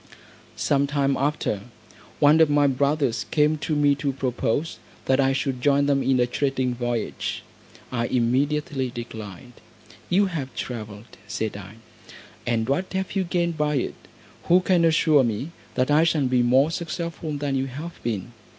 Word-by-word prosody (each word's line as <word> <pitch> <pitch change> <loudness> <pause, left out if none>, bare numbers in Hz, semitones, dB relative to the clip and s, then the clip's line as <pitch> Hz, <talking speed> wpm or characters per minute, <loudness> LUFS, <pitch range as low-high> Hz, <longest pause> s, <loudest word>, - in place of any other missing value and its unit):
Some 140 0 +1
time 140 -1 +1
after, 135 -8 -1 0.6
one 150 +2 +6
of 160 - +5
my 145 0 +4
brothers 140 -2 +1
came 150 0 +2
to 155 +1 -1
me 145 -1 +4
to 140 - 0
propose 130 +2 -2 0.3
that 130 0 +2
I 135 -1 +3
should 135 -2 -2
join 140 +1 +3
them 140 -1 +2
in 135 -1 +2
a 125 - +4
trading 130 0 -1
voyage; 120 -2 -3 0.5
I 120 -2 -1
immediately 135 +3 0
declined. 120 -2 -8 0.6
"You 195 +3 +4
have 140 -10 -4
travelled," 110 -2 -7
said 110 0 -3
I, 100 +1 -9 0.7
"and 115 -2 0
what 180 +8 -1
have 190 +1 -3
you 195 - +2
gained 170 -2 -1
by 150 0 +1
it? 130 - -1 0.5
Who 180 +2 +5
can 180 -2 +3
assure 155 -3 +4
me, 120 +7 -2 0.2
that 130 +3 +1
I 150 +2 +5
shall 160 -4 +2
be 125 -1 +2
more 130 +6 +4
successful 170 -2 -4
than 145 -1 -2
you 135 0 0
have 155 +6 -8
been?" 115 -1 -3
140 Hz, 160 wpm, -24 LUFS, 125-150 Hz, 0.7 s, one